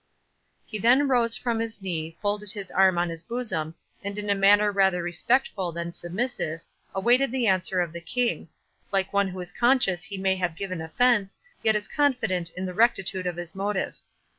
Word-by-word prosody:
He 215 - -6
then 255 +7 +4
rose 240 -3 +3
from 235 -2 -1
his 225 -2 -3
knee, 165 -4 -4
folded 205 0 -1
his 200 -3 -6
arm 190 -2 +4
on 175 0 +1
his 165 -1 -5
bosom, 175 -7 -3 0.3
and 200 +1 -4
in 205 -1 -1
a - - +5
manner 205 +1 +5
rather 190 -3 +2
respectful 185 +1 0
than 170 +1 -5
submissive, 175 -4 -3 0.3
awaited 240 +6 +3
the 255 -2 0
answer 185 -2 +2
of 170 -2 -3
the 170 - -7
King,—like 195 -2 -3
one 200 0 +3
who 185 0 -7
is 180 0 -6
conscious 240 -7 +3
he 200 -1 -5
may 190 0 +1
have 180 -3 -1
given 185 -2 -4
offence, 200 +4 +1 0.2
yet 220 -1 +3
is 210 0 -1
confident 245 - 0
in 185 - -3
the 180 - -4
rectitude 195 -4 +1
of 175 - -2
his 175 -2 -5
motive. 195 0 -2
195 Hz, 185 wpm, -26 LUFS, 180-225 Hz, 0.3 s, a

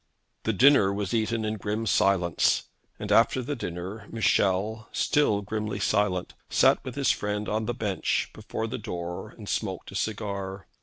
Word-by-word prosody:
The 110 - +2
dinner 125 -3 +6
was 100 -1 -3
eaten 115 0 0
in 110 0 -2
grim 105 +3 -2
silence, 95 -5 +3 0.3
and - - -5
after 130 - +4
the 145 +4 -3
dinner 95 0 -6
Michel, 110 0 +1
still 105 -9 +2
grimly 105 +1 -3
silent, 95 -3 +1 0.2
sat - - +4
with - - -6
his - - +3
friend 105 0 -2
on 110 +1 -1
the 120 - -1
bench 105 -6 -1
before 110 - -4
the 115 - -4
door 90 -5 -5
and - - -12
smoked - - -3
a - - -9
cigar. 100 -3 -3
105 Hz, 160 wpm, -27 LUFS, 95-110 Hz, 0.3 s, dinner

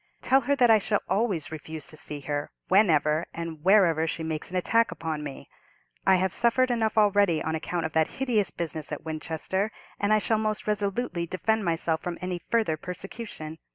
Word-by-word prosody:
"Tell 270 +1 +4
her 280 +3 +1
that 245 -4 +5
I 220 - +7
shall 205 +1 0
always 195 -8 0
refuse 155 -1 -6
to - - -7
see 150 -1 -6
her, 145 +1 -3 0.2
whenever 160 -5 +3
or 170 - -3
wherever 165 0 +3
she 160 - -3
makes 160 -1 -3
an 185 - -2
attack 230 +5 +3
upon 160 -2 -4
me. 140 -2 -8 0.6
I 190 - +7
have 185 0 +1
suffered 245 +2 +3
enough 225 -2 0
already 205 -5 +4
on 160 - -2
account 165 +1 -2
of 160 - -4
that 160 -1 +3
hideous 235 -7 +1
business 160 -3 -4
at 150 - -5
Winchester, 160 +6 -2 0.3
and 205 +1 +1
I 215 - +6
shall 215 +1 +1
most 215 -1 -1
resolutely 205 -3 -1
defend 220 +4 0
myself 165 -1 0
from 175 -1 -4
any 180 -1 -4
further 220 -9 +1
persecution. 180 -2 -7
180 Hz, 190 wpm, -27 LUFS, 160-215 Hz, 0.6 s, I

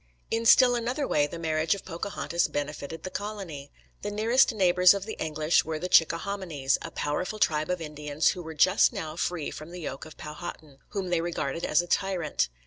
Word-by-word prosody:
In 230 0 0
still 250 +2 +7
another 245 +4 -1
way 145 -1 +2
the 170 - -7
marriage 160 +2 +1
of 200 - -10
Pocahontas 170 0 -2
benefited 145 +2 -5
the 185 - -5
colony. 190 -9 -6 0.3
The 205 - -3
nearest 225 +6 +3
neighbours 180 -3 +5
of 200 -1 -4
the 220 - -5
English 155 +1 +2
were 160 -1 -3
the 180 +3 -4
Chickahominys, 165 -5 +2
a - - -6
powerful 180 +8 -2
tribe 155 -6 +1
of 180 0 0
Indians 150 -1 0
who 180 - -3
were 160 -1 -8
just 185 +6 +5
now 160 -7 -5
free 170 -2 -2
from 155 +2 -9
the 175 0 -8
yoke 135 -2 -6
of 155 - -13
Powhatan, 150 -2 -8
whom 195 -3 -4
they 170 -2 +2
regarded 165 -2 -3
as 155 +3 +3
a - - -9
tyrant. 175 - 0
170 Hz, 195 wpm, -27 LUFS, 155-195 Hz, 0.3 s, still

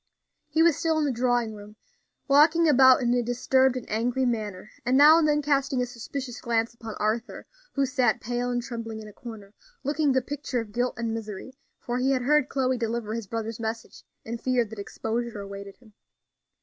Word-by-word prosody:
He 320 - +3
was 335 -3 +4
still 325 -1 +1
in 310 - +1
the 285 - +1
drawing 245 -2 0
room, 210 0 -12 0.5
walking 310 +4 +5
about 260 -3 +6
in 240 0 +2
a 245 - +2
disturbed 255 +2 +2
and 250 - -7
angry 245 +4 0
manner, 215 -5 -3
and 250 +2 +2
now 305 +3 +8
and 315 - +2
then 295 0 +2
casting 275 -2 +1
a 250 - +1
suspicious 245 +1 -7
glance 230 -1 0
upon 225 -2 -8
Arthur, 220 +3 -2 0.3
who 275 -1 +1
sat 250 -5 +1
pale 245 +1 -2
and 245 -1 -1
trembling 230 -3 -6
in 215 - -9
a 210 - -12
corner, 215 -4 -10 0.3
looking 290 +1 +1
the 260 -1 +1
picture 280 -2 -3
of 225 -2 -6
guilt 245 +3 -1
and 230 -1 -2
misery; 220 +2 -6 0.2
for 245 +1 -3
he 260 +2 +1
had 255 -2 0
heard 295 +1 +3
Chloe 260 -2 0
deliver 230 -2 -2
his 230 -3 -4
brother's 225 +1 -4
message, 225 0 -5 0.2
and 230 +1 -5
feared 245 -4 0
that 220 - -8
exposure 225 +2 -4
awaited 200 0 -8
him. 225 -4 -21
245 Hz, 200 wpm, -26 LUFS, 225-265 Hz, 0.5 s, now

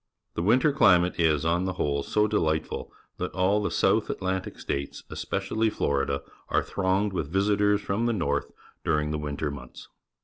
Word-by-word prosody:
The - - -2
winter 125 - +4
climate 90 -9 +4
is, 80 -2 +2
on 85 +2 +1
the 95 - -1
whole, 70 -5 0
so 105 +8 +1
delightful 80 -7 -1 0.3
that - - -3
all 95 +3 +2
the - - -1
South - - +2
Atlantic 95 0 -3
States, 70 0 -4
especially 110 0 -1
J^lorida, 70 -7 0 0.3
are - - +2
thronged 95 +1 0
with 75 -5 -3
visitors 105 +1 +2
from 110 +5 -1
the 120 - +1
north 70 -8 -1 0.3
during 75 0 +1
the 75 - -2
winter 75 0 -3
months. 65 -3 -10
90 Hz, 165 wpm, -27 LUFS, 75-105 Hz, 0.3 s, winter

